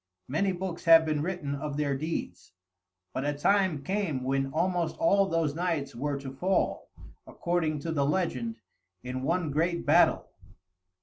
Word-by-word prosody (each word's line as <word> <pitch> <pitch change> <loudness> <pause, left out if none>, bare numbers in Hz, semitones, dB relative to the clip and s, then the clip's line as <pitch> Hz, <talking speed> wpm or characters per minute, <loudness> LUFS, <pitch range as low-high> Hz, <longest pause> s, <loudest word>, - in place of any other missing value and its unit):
Many 190 +8 +1
books 180 -1 -5
have 165 -1 +8
been 155 -2 0
written 165 -4 -3
of 145 0 -4
their 145 -2 0
deeds; 155 - -5 0.6
but 130 - -2
a 145 +1 0
time 185 -2 +2
came 175 -7 -1
when 135 +1 0
almost 175 +1 0
all 200 -12 +3
those 165 -5 0
knights 160 -4 -2
were 140 +3 -2
to 135 -1 -7
fall, 185 +8 0 0.4
according 170 -3 -1
to 165 - -3
the 145 -3 +1
legend, 140 -8 -1 0.5
in 125 +1 -4
one 165 +2 0
great 170 +4 0
battle. - - +4
155 Hz, 150 wpm, -28 LUFS, 140-175 Hz, 0.6 s, have